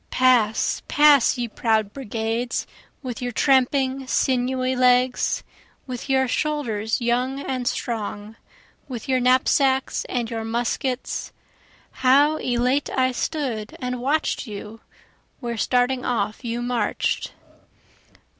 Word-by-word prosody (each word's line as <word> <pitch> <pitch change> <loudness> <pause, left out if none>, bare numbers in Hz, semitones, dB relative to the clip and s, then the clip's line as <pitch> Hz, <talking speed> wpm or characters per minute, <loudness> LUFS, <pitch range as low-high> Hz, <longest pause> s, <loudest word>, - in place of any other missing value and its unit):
(Pass, 245 -4 +2
pass, 290 -4 +5
ye 240 -1 -2
proud 220 -2 0
brigades, 230 -1 -2 0.4
with 250 -2 -5
your 245 0 -2
tramping 265 +1 +2
sinewy 255 +1 +1
legs, 250 0 +2 0.4
With 255 +1 -7
your 265 -1 +3
shoulders 245 -6 -1
young 250 +3 0
and 255 -3 -3
strong, 215 -3 -3 0.5
with 250 -1 -7
your 260 -1 +2
knapsacks 260 +1 +2
and 240 -2 -2
your 225 -1 -4
muskets; 240 +3 -2 0.7
How 285 +4 +5
elate 250 +3 0
I 260 0 +3
stood 250 -6 -3
and 250 -1 -3
watch'd 285 0 0
you, 210 +1 -8 0.6
where 235 -2 -4
starting 250 +2 +1
off 215 -1 -2
you 235 0 -3
march'd. 240 -4 -1
250 Hz, 110 wpm, -23 LUFS, 230-265 Hz, 0.7 s, pass